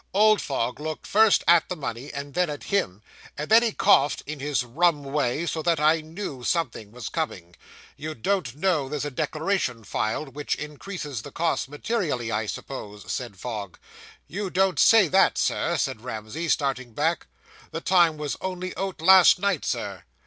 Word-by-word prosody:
Old 215 +1 +5
Fogg 125 -2 -2
looked 155 +1 -5
first 220 0 +4
at 170 -1 +5
the 180 - -2
money, 135 -2 -5
and 140 0 -6
then 180 -2 +1
at 145 - -6
him, 110 - -1 0.3
and 150 +5 -5
then 225 +1 +8
he 235 -2 +1
coughed 195 -8 +3
in 150 0 -6
his 140 -2 0
rum 150 +4 +1
way, 140 +2 -1
so 165 -1 -2
that 165 -1 +1
I 155 +2 +3
knew 155 -5 -7
something 120 -10 -2
was 125 +1 -7
coming. 90 - -4 0.4
"You 155 +2 -5
don't 135 - -1
know 155 -4 0
there's 150 0 -3
a 145 - -4
declaration 155 - -1
filed, 110 +7 -2
which 145 +1 -2
increases 150 - -6
the - - -9
costs 160 -6 -1
materially, 145 - -2
I 110 -1 -1
suppose," 105 -4 -7
said 120 -6 -4
Fogg. 105 -4 -6 0.5
"You 200 +1 -4
don't 185 -3 +1
say 225 -5 +6
that, 190 +4 +3
sir," 170 0 0
said 130 -6 -2
Ramsey, 120 +7 -5
starting 130 -6 0
back; 160 +7 0 0.4
"the - - -4
time 175 -4 +3
was 150 -1 -3
only 185 0 -4
out 190 -4 -4
last 190 0 +8
night, 195 -4 0
Sir." - - -3
150 Hz, 175 wpm, -25 LUFS, 130-180 Hz, 0.5 s, then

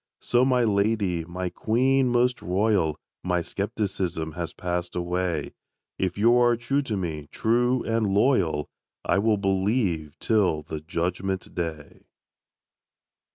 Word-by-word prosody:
So 120 +1 +2
my 130 -2 +3
lady, 100 -5 +1
my 90 +1 -4
queen 130 +7 +2
most 125 0 +2
royal, 90 -4 +1 0.3
My 90 -1 0
skepticism 90 -4 -2
has 85 +1 -4
passed 90 +1 -3
away; 90 -3 -2 0.5
If 95 -1 -1
you 115 +4 +5
are 120 -1 +4
true 135 +5 0
to 115 -7 -3
me, 80 -5 -4
true 120 +2 +1
and 115 -3 0
loyal, 95 - +2 0.4
I - - +2
will 110 +1 +2
believe 95 - 0
till 95 -9 +2
the 75 0 -6
Judgment 90 +4 -3
day. 80 -4 -6
95 Hz, 125 wpm, -25 LUFS, 85-115 Hz, 0.5 s, you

